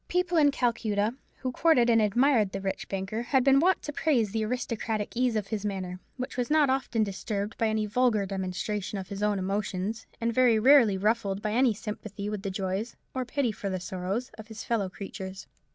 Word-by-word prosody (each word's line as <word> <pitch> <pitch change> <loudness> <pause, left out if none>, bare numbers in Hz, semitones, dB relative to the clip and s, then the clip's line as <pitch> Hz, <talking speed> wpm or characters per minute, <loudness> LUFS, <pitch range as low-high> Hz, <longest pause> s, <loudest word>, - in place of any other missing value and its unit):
People 360 0 0
in 290 -2 +6
Calcutta, 225 -5 0 0.2
who 255 - -3
courted 255 -3 +4
and 230 -2 +5
admired 220 -1 +3
the 195 - -2
rich 195 0 -4
banker, 195 +3 -3
had 255 +2 +2
been 270 0 +5
wont 365 +4 +3
to 295 - -5
praise 245 -10 +1
the 220 +1 -1
aristocratic 225 -2 -2
ease 245 -1 +1
of 210 -2 -2
his 215 -2 -3
manner, 185 -3 -3 0.2
which 255 0 -5
was 245 -1 -1
not 300 -3 +4
often 250 -4 0
disturbed 205 +1 -3
by 225 - +3
any 215 0 0
vulgar 215 -1 +2
demonstration 195 +2 -3
of 190 -1 -6
his 200 0 -5
own 210 -1 +2
emotions, 195 +2 -2
and 230 0 0
very 245 -2 +4
rarely 235 -4 +6
ruffled 205 -1 0
by 210 0 -2
any 240 0 +3
sympathy 210 -1 -6
with 210 -2 -4
the 200 - -3
joys, 195 +4 -3 0.2
or 260 -1 -2
pity 250 -1 0
for 200 -1 -5
the 185 -1 -2
sorrows, 185 +7 -3
of 215 - -9
his 220 -1 -8
fellow 215 -5 0
creatures. 190 0 -7
215 Hz, 200 wpm, -28 LUFS, 195-245 Hz, 0.2 s, in